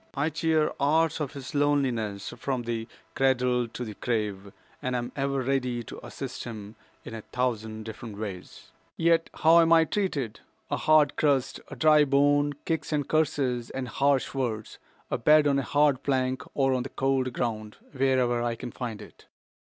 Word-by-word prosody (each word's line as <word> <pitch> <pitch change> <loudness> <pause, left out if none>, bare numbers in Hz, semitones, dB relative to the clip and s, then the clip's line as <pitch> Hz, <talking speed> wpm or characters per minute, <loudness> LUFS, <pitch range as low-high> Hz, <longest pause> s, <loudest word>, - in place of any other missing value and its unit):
I 145 +3 0
cheer 155 0 +1
hours 160 +3 +2
of 145 -2 -3
his 135 -2 -8
loneliness 130 -9 0
from 130 -3 -3
the 115 -1 -3 0.3
cradle 125 -2 +2
to 125 +2 -6
the 110 - -6
grave, 105 -3 -3 0.3
and 130 0 -2
am 120 0 -3
ever 140 -1 -1
ready 125 -2 -1
to - - -10
assist 130 -2 -6
him 110 -2 -8 0.3
in - - -8
a 110 - -6
thousand 110 -3 -3
different 110 -1 -8
ways. 100 -4 -8 0.3
Yet 165 0 +2
how 165 +2 +5
am 165 0 +4
I 165 -1 +6
treated? 145 - -2 0.3
A - - +1
hard 155 -2 +4
crust, 140 -4 +1
a - - -9
dry 155 -1 +5
bone, 145 +1 +3
kicks 165 -1 -2
and 145 -3 0
curses 135 -6 0
and 130 -1 -4
harsh 140 +2 +1
words, 115 -5 -3 0.3
a - - 0
bed 150 +5 +5
on 140 -1 +3
a - - +1
hard 145 0 +2
plank 130 -1 0
or 135 -1 +2
on 130 - 0
the 130 - -5
cold 135 -1 0
ground, 110 -3 -3 0.2
wherever 130 -3 +2
I 120 -1 -1
can 120 - -7
find 115 -4 -6
it. - - -17
130 Hz, 175 wpm, -27 LUFS, 120-145 Hz, 0.3 s, I